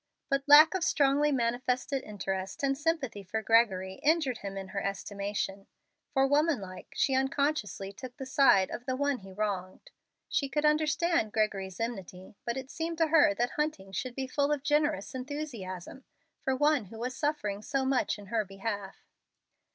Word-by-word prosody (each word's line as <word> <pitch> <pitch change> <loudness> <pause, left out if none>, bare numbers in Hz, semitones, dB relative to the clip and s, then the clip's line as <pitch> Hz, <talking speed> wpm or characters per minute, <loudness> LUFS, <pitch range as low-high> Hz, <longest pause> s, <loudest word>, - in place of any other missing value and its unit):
But 275 0 +3
lack 300 +3 +9
of 380 -3 -1
strongly 290 -1 +3
manifested 250 +2 0
interest 195 -1 -4
and 275 0 +2
sympathy 290 -8 -1
for 220 +4 -4
Gregory 190 -5 +2
injured 295 -5 +2
him 195 -1 -6
in 190 -1 -6
her 200 +1 -3
estimation; 200 0 -3 0.4
for 270 -1 +3
woman 295 +1 +3
like 185 -2 -9
she 270 - +2
unconsciously 265 -7 0
took 250 +5 -9
the 265 - -6
side 260 -8 +4
of 245 - -6
the 260 - 0
one 285 -1 0
he 195 0 -12
wronged. 195 - -4 0.4
She 275 - 0
could 295 +2 0
understand 310 -4 +2
Gregory's 195 -4 -1
enmity, 190 -5 -5
but 235 +2 -2
it 265 0 -6
seemed 330 +1 -3
to 325 -1 +2
her 300 -10 +5
that 240 +3 0
Hunting 300 -11 -2
should 245 +6 -4
be 270 - -2
full 280 +2 0
of 290 -2 -1
generous 295 0 +1
enthusiasm 260 - -6 0.4
for 265 - 0
one 295 -3 +2
who 220 +4 -11
was 250 +3 -3
suffering 280 -10 -1
so 265 +4 -1
much 265 -3 +1
in 205 - -11
her 220 -2 +2
behalf. 195 0 -6
255 Hz, 170 wpm, -30 LUFS, 200-290 Hz, 0.4 s, lack